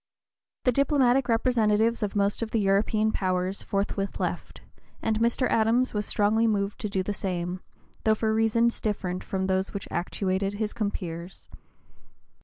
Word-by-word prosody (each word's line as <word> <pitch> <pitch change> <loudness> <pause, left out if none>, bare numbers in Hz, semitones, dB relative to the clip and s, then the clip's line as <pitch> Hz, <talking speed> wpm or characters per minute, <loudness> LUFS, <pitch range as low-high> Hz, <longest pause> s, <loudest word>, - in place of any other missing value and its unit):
The 250 - +4
diplomatic 270 -1 +3
representatives 225 -1 +2
of 210 -1 -2
most 200 +1 +1
of 230 - -2
the 225 - 0
European 210 +2 +2
powers 185 0 -1
forthwith 195 0 -2
left, - - -4 0.4
and 220 -1 0
Mr. 235 +3 +2
Adams 230 +3 +2
was 210 -1 -2
strongly 220 +2 +2
moved 200 -2 -1
to 210 - -3
do 190 -1 -1
the 205 - -2
same, 180 -2 -3 0.4
though 220 0 +4
for 220 0 0
reasons 225 +1 +2
different 185 -4 -2
from 190 -1 -2
those 190 +1 -1
which 200 - -4
actuated 190 +2 -1
his 215 0 -2
compeers. 180 -4 -5
210 Hz, 150 wpm, -27 LUFS, 195-225 Hz, 0.4 s, The